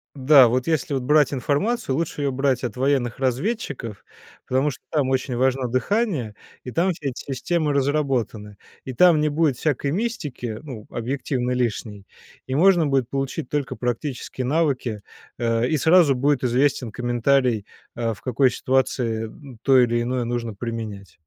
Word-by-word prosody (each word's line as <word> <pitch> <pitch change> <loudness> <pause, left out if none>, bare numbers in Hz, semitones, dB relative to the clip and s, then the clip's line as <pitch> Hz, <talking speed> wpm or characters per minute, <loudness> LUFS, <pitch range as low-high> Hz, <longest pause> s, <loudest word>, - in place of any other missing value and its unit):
Да, 135 -1 +7
вот 125 +2 0
если 155 -3 0
брать 145 +3 +3
информацию, 145 - 0
лучше 165 -2 -3
её 140 -1 0
брать 135 -1 0
от 125 - -4
военных 130 -2 0
разведчиков, 135 - -3 0.4
потому 135 +3 +1
что - - -10
там 145 -5 0
очень 130 -1 -1
важно 130 +1 +1
дыхание, 130 - -1 0.3
и 125 - -6
там 170 +8 +1
эти 140 -2 -2
системы 145 +4 -2
разработаны. 135 -7 -1 0.3
И 130 - -5
там 170 +4 +5
не 150 - +2
будет 150 -3 +1
всякой 140 -1 -1
мистики, 150 - -3
ну, 125 -8 -8
объективно 125 +1 -2
лишней, 110 -5 -2 0.4
и 130 - -2
можно 175 0 +4
будет 135 -4 +1
получить 135 -2 -3
только 145 -3 -2
практические 125 +1 -3
навыки, 130 -7 0 0.4
э, 115 0 +1
и 155 - +1
сразу 160 -1 +5
будет 135 0 +1
известен 125 -1 +1
комментарий, 120 -2 +1 0.3
а 115 -1 -2
в - - -15
какой 130 +1 +2
ситуации, 125 -4 0
м, 125 +1 -12
то 135 -1 +5
или 120 -1 +3
иное 125 +1 -1
нужно 115 -1 -3
применять. 105 -4 -6
130 Hz, 150 wpm, -23 LUFS, 120-145 Hz, 0.4 s, Да